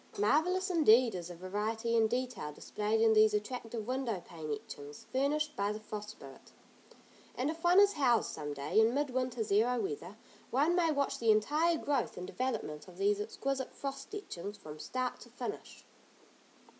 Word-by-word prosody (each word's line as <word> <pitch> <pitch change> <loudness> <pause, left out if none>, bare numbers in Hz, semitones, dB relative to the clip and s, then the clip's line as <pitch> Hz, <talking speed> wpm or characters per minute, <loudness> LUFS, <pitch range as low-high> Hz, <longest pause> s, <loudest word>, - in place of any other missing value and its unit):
Marvellous 355 - +2
indeed 250 - +5
is 175 -2 -5
the 175 - -8
variety 215 +6 -2
and 220 -1 +4
detail 245 -9 -2
displayed 210 +8 -1
in 225 -1 +5
these 215 -1 +5
attractive 225 0 -4
window 250 -5 -1
pane 160 -3 -8
etchings 145 0 -7
furnished 300 +3 +1
by 200 +1 0
the 210 - -5
Frost 210 -1 -6
Spirit, 135 -10 -13 0.8
and 270 +5 0
if 330 +1 -10
one 350 +2 +6
is 405 0 +6
housed 250 -6 +2
some 150 -1 -5
day, 145 +8 0
in 225 +3 +4
mid 285 -1 0
winter, 250 -2 -1
zero 225 +4 +2
weather, 190 0 -4 0.3
one 290 +7 +3
may 345 -2 +3
watch 280 -2 0
the 230 - +1
entire 300 +11 +3
growth 290 -2 -1
and 180 - -5
development 220 -14 -3
of 180 -1 -13
these 205 +1 +2
exquisite 265 +5 -3
frost 275 +6 -5
etchings 205 - -6
from 150 0 -10
start 255 +6 -3
to - - -13
finish. - - -7
230 Hz, 170 wpm, -33 LUFS, 205-275 Hz, 0.8 s, one